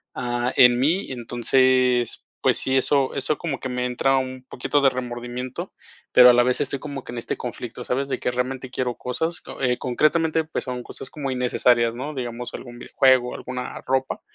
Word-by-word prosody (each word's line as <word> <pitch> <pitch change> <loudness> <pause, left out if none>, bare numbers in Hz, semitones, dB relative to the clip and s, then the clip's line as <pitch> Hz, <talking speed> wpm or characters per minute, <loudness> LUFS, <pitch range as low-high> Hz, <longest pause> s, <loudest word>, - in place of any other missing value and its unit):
ah, 120 0 -1
en 125 -1 +6
mí. 160 +6 +1
Entonces, 125 0 +2 0.2
pues - - +4
sí, 130 - 0
eso 135 0 +1
eso 145 +2 0
como 155 -6 -4
que 130 - -4
me 125 0 -2
entra 135 +2 +1
un 130 -1 -4
poquito 145 +3 0
de 135 - +6
remordimiento, 125 0 -5 0.4
pero 125 0 +9
a - - +7
la 120 0 +5
vez 125 0 +1
estoy 140 - -1
como 140 -2 -6
que 120 - -8
en - - -6
este - - -4
conflicto, 125 0 -6
¿sabes? 135 +2 -1
De 130 - -2
que 125 - -1
realmente 130 +1 -3
quiero 125 -1 -2
cosas, 160 +7 -3 0.2
eh, 125 -2 +1
concretamente, 155 +5 +1
pues 160 - -5
son 125 -1 -4
cosas 130 - -8
como 140 -3 -4
innecesarias, 120 -2 +2
¿no? 145 +5 -5
Digamos 125 -2 -5
algún 120 -1 -9
videojuego, 130 -1 +3
alguna 125 -1 -6
ropa. 130 0 0
125 Hz, 190 wpm, -23 LUFS, 125-135 Hz, 0.4 s, pero